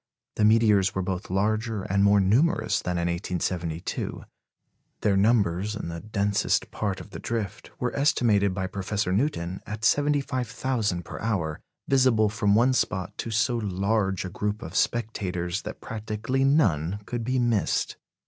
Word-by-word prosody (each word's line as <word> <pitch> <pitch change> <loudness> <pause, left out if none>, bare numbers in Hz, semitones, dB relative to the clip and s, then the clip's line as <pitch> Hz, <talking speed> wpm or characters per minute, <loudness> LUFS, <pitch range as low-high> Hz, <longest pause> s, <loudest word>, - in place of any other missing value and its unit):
The 105 - +4
meteors 105 -3 +4
were 95 - 0
both 95 0 -4
larger 105 +2 0
and 100 +1 +1
more 100 0 +5
numerous 120 - +2
than 90 -1 -2
in 85 - 0
1872. 85 -1 -3 0.8
Their 100 -2 +2
numbers 100 -1 +2
in 85 - -5
the 85 0 -5
densest 100 0 0
part 100 -3 -2
of - - -11
the - - -7
drift 115 -5 -4
were - - -2
estimated 115 -8 +3
by 95 0 -2
Professor 100 0 -2
Newton 95 - -1
at 110 +1 -4
75,000 130 - 0
per - - -7
hour, 90 -9 -1 0.3
visible 125 -5 +4
from 105 -1 +2
one 125 +4 +4
spot 95 -7 -1
to - - -3
so 115 +3 +1
large 100 -2 0
a - - -4
group 105 +4 -3
of - - -8
spectators 95 -6 -1
that - - -8
practically 110 +4 -2
none 105 - +2
could 120 +1 -3
be 130 +3 0
missed. 120 -4 +1
105 Hz, 150 wpm, -26 LUFS, 95-115 Hz, 0.8 s, more